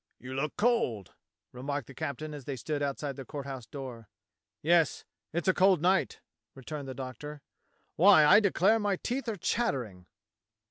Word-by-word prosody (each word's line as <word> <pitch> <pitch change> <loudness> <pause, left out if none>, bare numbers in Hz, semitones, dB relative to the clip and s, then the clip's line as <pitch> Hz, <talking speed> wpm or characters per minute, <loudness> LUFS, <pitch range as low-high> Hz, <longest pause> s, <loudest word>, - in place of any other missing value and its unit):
"You 125 +1 -8
look 140 +3 -2
cold," 205 - +1 0.4
remarked 140 +2 -4
the 140 - -12
captain 155 +1 -5
as 145 -4 -8
they 140 - -3
stood 145 +4 -3
outside 140 -1 -3
the 135 - -6
Court 140 +1 -7
House 130 -4 -7
door. 125 -6 -8 0.5
"Yes. 165 -1 +3 0.3
It's 170 +4 -2
a 185 - +5
cold 185 -1 +4
night," 185 +4 +1 0.3
returned 140 +1 -7
the 130 - -6
Doctor. 140 +3 -7 0.6
"WTiy, 180 -4 +8
I 150 - +8
declare 205 +1 +3
my 205 -2 +1
teeth 245 +5 -3
are 215 - -3
chattering." 120 - -2
145 Hz, 165 wpm, -30 LUFS, 130-185 Hz, 0.6 s, WTiy